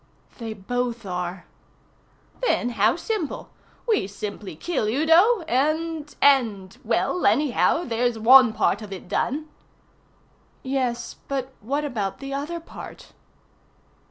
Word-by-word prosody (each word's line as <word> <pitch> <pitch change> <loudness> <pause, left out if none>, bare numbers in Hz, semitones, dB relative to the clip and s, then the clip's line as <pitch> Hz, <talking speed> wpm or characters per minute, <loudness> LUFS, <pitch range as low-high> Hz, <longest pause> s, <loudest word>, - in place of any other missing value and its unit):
"They 225 -2 -4
both 235 +2 -3
are." 180 -1 -4 1.0
"Then 365 - +1
how 220 -1 +2
simple. 375 - -4 0.4
We 430 - +2
simply 200 -2 -7
kill 330 - -2
Udo, 325 - +4
and 310 +1 -1
and 225 -9 +3
well, 360 - 0
anyhow, 300 +3 +2
there's 240 -2 0
one 250 +2 +7
part 210 -1 +1
of 210 -2 -9
it 190 -2 -8
done." 295 +11 -1 1.2
"Yes, 255 -3 -2
but 265 -1 -3
what 280 +7 -2
about 205 -8 -3
the 275 0 -6
other 300 +5 -3
part?" 330 - -11
250 Hz, 115 wpm, -24 LUFS, 215-300 Hz, 1.2 s, one